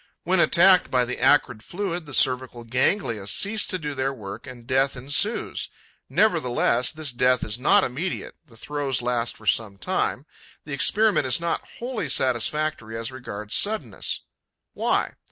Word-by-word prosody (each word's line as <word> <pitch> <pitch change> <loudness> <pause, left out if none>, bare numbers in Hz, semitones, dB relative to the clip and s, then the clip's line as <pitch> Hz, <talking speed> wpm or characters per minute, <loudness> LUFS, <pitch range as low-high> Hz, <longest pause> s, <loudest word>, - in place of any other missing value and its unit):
When 185 +1 +2
attacked 180 +1 +5
by 125 -1 +2
the 125 - -5
acrid 130 -4 +3
fluid, 175 - -4
the 145 - -10
cervical 125 -2 +2
ganglia 115 - 0
cease 210 - +2
to 185 - -1
do 150 -4 -5
their 135 0 -1
work; 105 -5 -9
and 125 -2 -11
death 135 +1 +1
ensues. 145 - -1 0.4
Nevertheless, 125 - +2
this 155 -3 -5
death 125 0 +2
is 105 +3 -2
not 195 +9 +4
immediate; 155 +9 -4
the 120 -8 -18
throes 140 -1 -3
last 120 -1 -1
for - - -16
some 105 -4 +1
time. - - -1 0.4
The 150 - -7
experiment 195 +2 +3
is 125 - +2
not 170 0 -2
wholly 245 -1 -4
satisfactory 130 -1 0
as 115 +2 -4
regards 105 -5 -7
suddenness. 200 - -1 0.5
Why? - - 0
130 Hz, 155 wpm, -24 LUFS, 120-170 Hz, 0.5 s, attacked